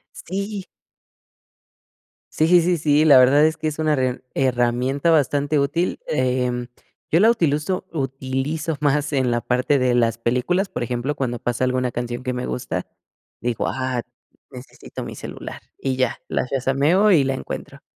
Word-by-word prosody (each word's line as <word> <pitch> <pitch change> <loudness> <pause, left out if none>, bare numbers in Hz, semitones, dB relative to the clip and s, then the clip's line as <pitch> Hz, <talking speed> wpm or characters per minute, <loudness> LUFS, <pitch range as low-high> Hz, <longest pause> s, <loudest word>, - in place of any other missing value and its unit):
Sí. 200 +1 -5 1.7
Sí, 155 - +3
sí, 175 0 +6
sí, 175 0 +2
si, 150 0 +3
la 140 -4 +8
verdad 140 +4 +6
es 160 0 +1
que 155 - -2
es 155 - -3
una 155 -1 +1
herram 130 -2 0
herramienta 130 +4 +1
bastante 145 -1 +2
útil. 165 +6 0
Em. 125 -2 0 0.5
Yo 165 - +4
la 220 +4 +6
utiluzo 165 -4 0
utilizo 135 +3 -2
más 145 +1 +1
en 130 -3 +1
la 120 - +1
parte 125 +4 +1
de 125 -2 +2
las 115 -2 +2
películas. 125 - 0
Por - - -6
ejemplo, 120 +4 -2
cuando 125 -4 -2
pasa 120 +2 -2
alguna 130 -1 0
canción 120 +1 -4
que 125 - -2
me 125 0 -3
gusta, 125 - -4 0.5
digo: 120 -1 -2
"Ah, 130 -2 -2 0.5
necesito 125 -2 -10
mi - - -7
celular". - - -8 0.2
Y 135 -1 -2
ya, 130 -2 0
las 125 - -2
shazameo 140 +10 +2
y 150 -6 +5
la 135 0 -1
encuentro. - - -7
135 Hz, 160 wpm, -22 LUFS, 125-155 Hz, 1.7 s, la